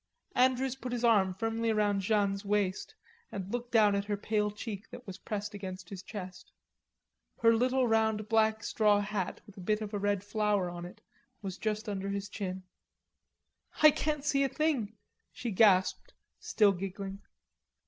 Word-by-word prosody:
Andrews 260 Hz, +1 st, +2 dB
put 255 Hz, -2 st, -6 dB
his 245 Hz, 0 st, -2 dB
arm 205 Hz, -5 st, +4 dB
firmly 225 Hz, +3 st, -1 dB
round 205 Hz, -2 st, +1 dB
Jeanne's 200 Hz, 0 st, +1 dB
waist 200 Hz, -2 st, -1 dB, 0.4 s
and 195 Hz, -1 st, -5 dB
looked 245 Hz, 0 st, -4 dB
down 215 Hz, -3 st, +5 dB
at 200 Hz, 0 st, 0 dB
her 205 Hz, 0 st, -1 dB
pale 210 Hz, 0 st, 0 dB
cheek 210 Hz, -1 st, -7 dB
that 250 Hz, -, -10 dB
was 190 Hz, -2 st, -8 dB
pressed 210 Hz, 0 st, -4 dB
against 185 Hz, -3 st, -7 dB
his 195 Hz, -2 st, -7 dB
chest. 190 Hz, -3 st, -8 dB, 0.9 s
Her 230 Hz, 0 st, +7 dB
little 250 Hz, +2 st, +2 dB
round 220 Hz, -1 st, +1 dB
black 220 Hz, 0 st, +2 dB
straw 210 Hz, -2 st, +3 dB
hat 205 Hz, -3 st, -3 dB
with 205 Hz, -, -16 dB
a -, -, -8 dB
bit 210 Hz, +4 st, +1 dB
of 215 Hz, -1 st, -6 dB
a 205 Hz, -, -1 dB
red 200 Hz, -1 st, 0 dB
flower 205 Hz, -3 st, 0 dB
on 175 Hz, 0 st, -7 dB
it 180 Hz, -, -12 dB, 0.4 s
was 190 Hz, -1 st, -5 dB
just 215 Hz, +1 st, -2 dB
under 200 Hz, -1 st, -3 dB
his 200 Hz, 0 st, -3 dB
chin. 190 Hz, -3 st, -5 dB, 1.2 s
"I 305 Hz, -, +10 dB
can't 300 Hz, -1 st, -2 dB
see 275 Hz, -1 st, +2 dB
a 270 Hz, -, +1 dB
thing," 260 Hz, -10 st, -1 dB, 0.3 s
she 235 Hz, -, -4 dB
gasped, 190 Hz, -2 st, +3 dB, 0.2 s
still 210 Hz, -3 st, +3 dB
giggling. 195 Hz, +1 st, -5 dB
210 Hz, 170 wpm, -31 LUFS, 195-225 Hz, 1.2 s, I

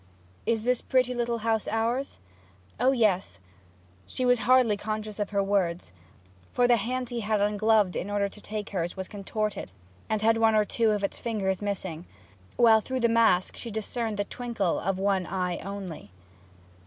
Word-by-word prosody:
'Is 225 Hz, -2 st, +1 dB
this 250 Hz, 0 st, +1 dB
pretty 255 Hz, -1 st, +1 dB
little 240 Hz, -1 st, -1 dB
house 225 Hz, -2 st, +1 dB
ours?' 235 Hz, +5 st, -1 dB, 0.6 s
'O 255 Hz, +3 st, +4 dB
yes.' 215 Hz, -7 st, +1 dB, 0.7 s
She 255 Hz, -, -3 dB
was 245 Hz, -1 st, +4 dB
hardly 255 Hz, -4 st, +5 dB
conscious 215 Hz, 0 st, -5 dB
of 205 Hz, -, -1 dB
her 200 Hz, -1 st, +1 dB
words, 180 Hz, -, 0 dB, 0.6 s
for 245 Hz, -, +3 dB
the 240 Hz, -1 st, +5 dB
hand 250 Hz, +3 st, -3 dB
he 240 Hz, -, -3 dB
had 215 Hz, -1 st, 0 dB
ungloved 210 Hz, -1 st, +2 dB
in 190 Hz, -, -3 dB
order 205 Hz, -1 st, +1 dB
to 210 Hz, +1 st, -13 dB
take 210 Hz, 0 st, -5 dB
hers 175 Hz, -2 st, -2 dB
was 190 Hz, -1 st, -4 dB
contorted, 210 Hz, -, -3 dB, 0.4 s
and 215 Hz, -1 st, 0 dB
had 225 Hz, +1 st, +4 dB
one 225 Hz, -1 st, +4 dB
or 210 Hz, -1 st, +4 dB
two 225 Hz, +1 st, +1 dB
of 210 Hz, -1 st, 0 dB
its 200 Hz, -, -2 dB
fingers 200 Hz, -5 st, -1 dB
missing; 185 Hz, -5 st, -4 dB, 0.5 s
while 225 Hz, -2 st, +6 dB
through 260 Hz, +3 st, -3 dB
the 235 Hz, -, +4 dB
mask 225 Hz, -6 st, +3 dB
she 235 Hz, -, -7 dB
discerned 220 Hz, 0 st, -3 dB
the 205 Hz, -, +1 dB
twinkle 225 Hz, -6 st, -2 dB
of 195 Hz, +1 st, -1 dB
one 195 Hz, -2 st, 0 dB
eye 180 Hz, -2 st, -2 dB
only. 195 Hz, -, -7 dB
215 Hz, 175 wpm, -27 LUFS, 200-235 Hz, 0.7 s, while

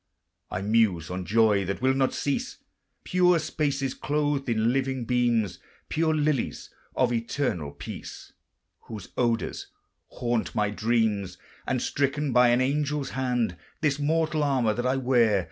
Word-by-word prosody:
I 95 Hz, -, -3 dB
muse 100 Hz, -6 st, +2 dB
on 90 Hz, 0 st, -4 dB
joy 105 Hz, -1 st, +3 dB
that 100 Hz, +2 st, -3 dB
will 130 Hz, +1 st, +2 dB
not 135 Hz, -1 st, +1 dB
cease, 140 Hz, -1 st, -2 dB, 0.5 s
Pure 180 Hz, -1 st, +3 dB
spaces 140 Hz, -4 st, -1 dB
clothed 145 Hz, -2 st, -1 dB
in 115 Hz, +1 st, +2 dB
living 130 Hz, -2 st, -1 dB
beams, 120 Hz, -5 st, +1 dB, 0.3 s
Pure 160 Hz, 0 st, +1 dB
lilies 150 Hz, -4 st, -1 dB, 0.2 s
of -, -, +2 dB
eternal 115 Hz, -, -1 dB
peace, 70 Hz, -, -9 dB, 0.5 s
Whose 105 Hz, -4 st, -8 dB
odors 120 Hz, -2 st, -1 dB, 0.4 s
haunt 120 Hz, -2 st, -2 dB
my 105 Hz, -2 st, +1 dB
dreams; 105 Hz, -4 st, 0 dB, 0.3 s
And, -, -, 0 dB
stricken 140 Hz, 0 st, 0 dB
by 125 Hz, +1 st, +6 dB
an 120 Hz, +1 st, +3 dB
angel's 145 Hz, +1 st, -1 dB
hand, 125 Hz, -8 st, -1 dB, 0.2 s
This 145 Hz, -2 st, +1 dB
mortal 155 Hz, +1 st, +1 dB
armor 130 Hz, -6 st, +2 dB
that 120 Hz, +3 st, -1 dB
I 130 Hz, -, +2 dB
wear. 120 Hz, -5 st, +3 dB
125 Hz, 140 wpm, -26 LUFS, 110-140 Hz, 0.5 s, by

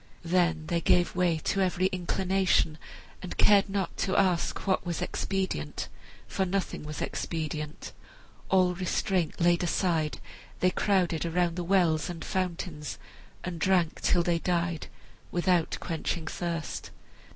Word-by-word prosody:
Then 170 Hz, -2 st, +2 dB
they 170 Hz, +1 st, 0 dB
gave 175 Hz, +2 st, +3 dB
way 175 Hz, -2 st, +2 dB
to 195 Hz, -, +1 dB
every 185 Hz, -1 st, +1 dB
inclination, 185 Hz, -3 st, +1 dB, 0.4 s
and 185 Hz, -, -6 dB
cared 200 Hz, -1 st, +5 dB
not 195 Hz, -3 st, -2 dB
to 190 Hz, -, 0 dB
ask 185 Hz, -3 st, +1 dB
what 190 Hz, -2 st, +1 dB
was 175 Hz, -3 st, -3 dB
expedient, 190 Hz, -, -2 dB, 0.4 s
for 190 Hz, -, -1 dB
nothing 190 Hz, 0 st, -2 dB
was 150 Hz, 0 st, -5 dB
expedient. 155 Hz, -2 st, -4 dB, 0.6 s
All 185 Hz, -1 st, +4 dB
restraint 180 Hz, -1 st, -1 dB
laid 175 Hz, 0 st, +4 dB
aside, 170 Hz, -3 st, 0 dB, 0.4 s
they 185 Hz, -, +3 dB
crowded 180 Hz, -5 st, +1 dB
around 170 Hz, 0 st, +1 dB
the 175 Hz, -, -2 dB
wells 175 Hz, -4 st, +2 dB
and 165 Hz, -2 st, -6 dB
fountains 170 Hz, -5 st, -3 dB, 0.5 s
and 175 Hz, -2 st, -4 dB
drank 180 Hz, -3 st, +2 dB
till 175 Hz, -, +3 dB
they 170 Hz, -1 st, +1 dB
died, 170 Hz, -2 st, -1 dB, 0.4 s
without 175 Hz, -1 st, +1 dB
quenching 165 Hz, 0 st, -3 dB
thirst. 170 Hz, -1 st, -4 dB
175 Hz, 130 wpm, -29 LUFS, 165-185 Hz, 0.6 s, cared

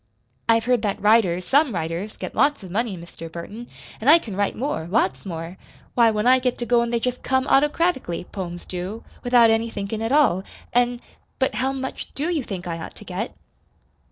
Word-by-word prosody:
"I've 225 Hz, 0 st, +5 dB
heard 250 Hz, -2 st, +2 dB
that 205 Hz, -2 st, -1 dB
writers 200 Hz, -5 st, +3 dB
some 280 Hz, -5 st, +3 dB
writers 170 Hz, +5 st, -3 dB
get -, -, -6 dB
lots 285 Hz, -1 st, +2 dB
of 185 Hz, -, -9 dB
money, 215 Hz, -1 st, -1 dB
Mr. 165 Hz, -1 st, -10 dB
Burton, 205 Hz, +8 st, -8 dB, 0.3 s
an' 235 Hz, -, +2 dB
I 320 Hz, -, +10 dB
can 225 Hz, -, -6 dB
write 200 Hz, 0 st, 0 dB
more 245 Hz, -, -2 dB
lots 195 Hz, +1 st, 0 dB
more. 165 Hz, +1 st, -6 dB, 0.4 s
Why, 235 Hz, -2 st, +5 dB
when 215 Hz, 0 st, 0 dB
I 255 Hz, +1 st, +6 dB
get 250 Hz, -1 st, -1 dB
to 240 Hz, -, -3 dB
goin' 235 Hz, -1 st, +3 dB
they 235 Hz, 0 st, +1 dB
jest 250 Hz, +1 st, -2 dB
come 260 Hz, 0 st, +1 dB
autocratically 295 Hz, -, +2 dB
poems 175 Hz, -2 st, -6 dB
do 185 Hz, +5 st, -5 dB, 0.2 s
without 245 Hz, -2 st, +6 dB
any 225 Hz, +1 st, +1 dB
thinkin' 210 Hz, 0 st, -4 dB
at 225 Hz, +2 st, -1 dB
all; 260 Hz, -11 st, +4 dB, 0.3 s
an' 245 Hz, 0 st, +2 dB, 0.4 s
But 265 Hz, -, +1 dB
how 265 Hz, +1 st, 0 dB
much 265 Hz, -1 st, -5 dB
DO 300 Hz, +5 st, -1 dB
you 310 Hz, -6 st, 0 dB
think 190 Hz, -5 st, -6 dB
I 170 Hz, -1 st, -4 dB
ought 160 Hz, -, -8 dB
to 210 Hz, -, -13 dB
get?" 195 Hz, +5 st, -4 dB
225 Hz, 200 wpm, -23 LUFS, 185-250 Hz, 0.4 s, I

